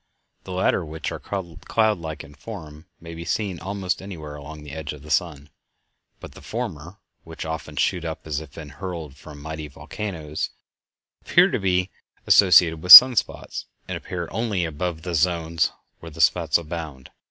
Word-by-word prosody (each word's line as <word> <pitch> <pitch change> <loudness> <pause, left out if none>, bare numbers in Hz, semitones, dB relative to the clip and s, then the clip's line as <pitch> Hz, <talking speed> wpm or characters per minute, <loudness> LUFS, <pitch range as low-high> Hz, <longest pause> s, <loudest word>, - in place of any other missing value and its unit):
The 95 - -8
latter, 90 0 +1
which 80 0 -5
are - - -6
cloud 100 +3 -2
like 80 -2 -7
in 75 -2 -14
form, 80 -3 -10
may 85 0 -10
be 85 +1 -7
seen 95 +1 -2
almost 95 0 -3
anywhere 80 -7 -8
along 75 +1 -10
the 75 - -10
edge 80 -1 -6
of 75 -1 -13
the 75 - -9
sun; 75 -2 -1 0.7
but - - -10
the - - -14
former, 80 +6 -6 0.3
which 80 -1 -8
often 80 -1 -6
shoot 85 +5 0
up 80 -2 -6
as 75 -2 -2
if 80 -3 -12
hurled 80 -1 -7
from 75 -1 -13
mighty 80 +1 -7
volcanoes, 80 0 -5 0.7
appear - - +4
to - - -1
be 90 0 0 0.3
associated 85 -4 +5
with 90 0 +9
sun 125 +5 +13
spots, - - -3 0.2
and - - -4
appear 85 -2 -5
only 105 -5 -1
above 80 +1 -4
the 90 -1 -4
zones 85 0 +1 0.3
where 85 - -10
spots - - +3
abound. 80 -5 -8
80 Hz, 165 wpm, -23 LUFS, 75-90 Hz, 0.7 s, sun